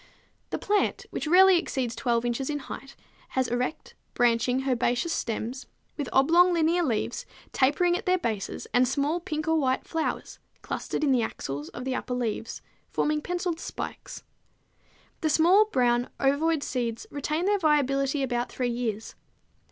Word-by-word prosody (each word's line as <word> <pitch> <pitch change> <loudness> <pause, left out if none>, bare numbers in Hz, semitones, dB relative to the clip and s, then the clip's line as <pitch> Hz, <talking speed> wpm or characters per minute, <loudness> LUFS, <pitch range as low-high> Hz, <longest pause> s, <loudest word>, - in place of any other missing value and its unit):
_ - - -43
The - - -2
plant, 415 0 0
which - - -3
rarely 370 +2 +7
exceeds 250 -8 -3
12 235 0 0
inches 240 +3 -1
in 295 - -1
height, 275 0 -9 0.4
has 260 -1 +2
erect, 250 +5 -3 0.2
branching, 245 +1 +2
herbaceous 250 +5 +1
stems, 235 +4 -3 0.3
with 290 -3 -4
oblong 340 +7 +5
linear 335 +1 +2
leaves, 240 -10 -1 0.3
tapering 345 +7 +3
at 365 - -5
their 365 0 +4
bases, 220 - -3
and 250 +1 +4
small 285 +6 0
pink 310 -3 -4
or 320 0 +3
white 260 -2 0
flowers 325 -1 -3 0.2
clustered - - -3
in 285 - +3
the 250 -2 +3
axils 145 -9 -4
of 250 - -8
the 265 - -1
upper 255 -1 -3
leaves, 230 -2 -3 0.3
forming 300 0 0
penciled 355 0 -2
spikes. - - -7 1.0
The 315 - +1
small, 350 +7 +5
brown, 245 - +1
ovoid 285 +3 +2
seeds 235 -3 -3
retain 300 +4 -2
their 410 0 +2
viability 275 -3 +2
about 245 -2 -1
three 250 -1 -1
years. 225 -3 -3
275 Hz, 155 wpm, -27 LUFS, 245-325 Hz, 1.0 s, rarely